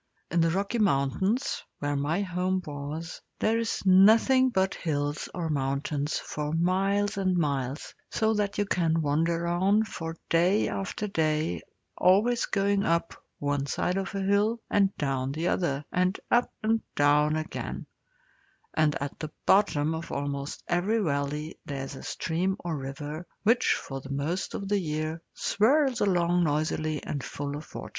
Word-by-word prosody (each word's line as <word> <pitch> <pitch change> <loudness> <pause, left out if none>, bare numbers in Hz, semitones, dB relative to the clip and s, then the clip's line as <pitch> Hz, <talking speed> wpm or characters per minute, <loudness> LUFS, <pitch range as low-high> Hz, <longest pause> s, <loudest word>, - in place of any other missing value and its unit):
In 170 0 +3
the 165 - +3
Rocky 200 +7 -1
Mountains, 190 - +1 0.2
where 145 0 -1
my 155 +7 0
home 185 0 0
was, 150 +3 -6 0.2
there 225 +1 +2
is 230 -3 -2
nothing 220 +8 +6
but 190 -5 +1
hills, 145 -2 -2
or 175 -2 -2
mountains, 140 0 -1
for 150 0 -4
miles 195 +5 +1
and 185 -2 +1
miles, 140 -3 -2 0.2
so 220 -1 +1
that 205 -2 -1
you 205 - +1
can 165 -4 +1
wander 165 +4 +1
on 190 +5 +3
for 165 -6 -6
day 180 +5 +3
after 195 +2 -3
day, 155 - 0 0.3
always 220 +6 +3
going 200 0 +1
up 170 -3 +1 0.2
one 145 -1 -1
side 180 +5 0
of 195 +1 -3
a 195 - -1
hill 205 +4 +2
and 200 -1 +4
down 135 -2 -1
the 160 +4 -1
other, 145 -6 0
and 185 +1 +1
up 240 +1 +3
and 225 +1 +2
down 150 +1 +4
again; 155 0 -4 0.9
and 155 -2 +2
at 140 0 -5
the 155 - -4 0.2
bottom 160 -6 +3
of 160 +1 -5
almost 140 0 -3
every 180 +6 +1
valley 150 -4 -2
there 140 -2 -4
is 135 - -8
a - - -9
stream 180 +4 -1
or 170 -2 -3
river, 145 +4 -6 0.2
which 230 +3 +4
for 135 -1 -6
most 150 +7 -2
of 195 - -4
the 205 0 +2
year 155 -1 -3
swirls 265 +4 +2
along 175 -2 +3
noisily 155 0 0
and 140 - -4
full 145 0 -4
of 150 +1 -10
water. - - -6
170 Hz, 155 wpm, -28 LUFS, 145-195 Hz, 0.9 s, nothing